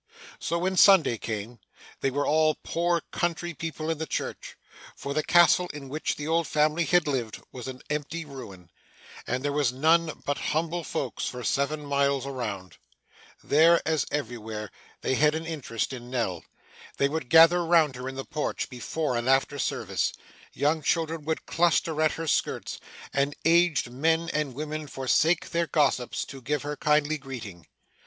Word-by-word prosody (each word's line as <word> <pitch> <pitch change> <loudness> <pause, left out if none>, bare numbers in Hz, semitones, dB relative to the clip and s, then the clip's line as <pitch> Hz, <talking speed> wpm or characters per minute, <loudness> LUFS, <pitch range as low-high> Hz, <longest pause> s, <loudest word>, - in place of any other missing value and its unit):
So, 170 - -1
when 185 +2 -1
Sunday 170 - +6
came. 110 +2 -5 0.4
They 135 - +1
were 145 +2 -1
all 155 0 +3
poor 170 0 0
country 175 0 -2
people 160 0 -4
in 160 - -3
the 160 - -3
church, - - -5 0.4
for 140 - -5
the 155 - +1
castle 175 +2 +5
in 140 -2 -8
which 155 +3 -2
the 145 - -5
old 165 0 +1
family 155 +2 +2
had 175 -1 +3
lived, 125 -7 -2
was 125 -1 -8
an 130 -1 -8
empty 150 +2 -3
ruin, 100 - -11 0.6
and 130 +3 -2
there 145 - 0
were 145 -2 +2
none 160 +5 +2
but 145 - -1 0.2
humble 170 +1 -1
folks 140 -6 -3
for 125 -1 -5
seven 145 +5 0
miles 140 -1 +1
around. 105 -10 -5 0.7
There, 165 +3 +5
as 160 -1 +1
elsewhere, 110 -6 -4 0.3
they - - 0
had 150 +3 +3
an 160 +1 -4
interest 140 -8 -3
in 120 -1 -8
Nell. 115 -10 -2 0.5
They 140 - +3
would 140 -3 -4
gather 165 +2 +7
round 165 -5 +3
her 125 +1 -5
in 135 - -8
the 135 - -5
porch, 150 -1 -3
before 130 +2 -3
and 120 +2 -1
after 135 +2 +2
service; - - -1 0.4
young 155 +2 +1
children 160 0 -1
would 160 0 -2
cluster 165 -2 +1
at 155 -1 +3
her 165 - -5
skirts; 155 - -1 0.3
and 140 +1 +1
aged 165 -6 +3
men 160 +5 +1
and 150 -4 -1
women 155 +1 -4
forsake 145 +6 +1
their 170 0 0
gossips, 135 -6 +1
to 135 -1 -10
give 145 +4 -2
her 150 0 -3
kindly 150 +1 +2
greeting. 115 - -9
150 Hz, 170 wpm, -27 LUFS, 130-160 Hz, 0.7 s, gather